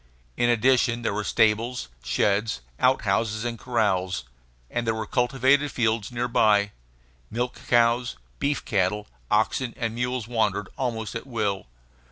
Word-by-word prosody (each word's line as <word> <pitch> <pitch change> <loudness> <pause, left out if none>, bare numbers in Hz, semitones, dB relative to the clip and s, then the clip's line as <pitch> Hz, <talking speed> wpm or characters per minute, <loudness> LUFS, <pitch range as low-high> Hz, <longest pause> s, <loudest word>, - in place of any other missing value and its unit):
In 120 - +2
addition, 120 0 +3
there 110 - 0
were 105 +1 -2
stables, 110 - +1 0.2
sheds, 100 - +1 0.2
outhouses, 110 0 +1
and 115 -2 -3
corrals; 95 - 0 0.4
and 120 - -3
there 115 - +1
were 110 -1 -3
cultivated 135 +4 +2
fields 115 -2 0
near 120 0 -1
by. 105 -3 +3 0.6
Milch 120 +2 -2
cows, 120 0 +3 0.2
beef 145 0 -1
cattle, 105 +1 0 0.2
oxen, 115 +3 +1
and 115 -2 -2
mules 125 -1 -2
wandered 105 -4 0
almost 115 -5 -3
at 115 +4 -6
will. 105 - -2
115 Hz, 135 wpm, -25 LUFS, 105-125 Hz, 0.6 s, addition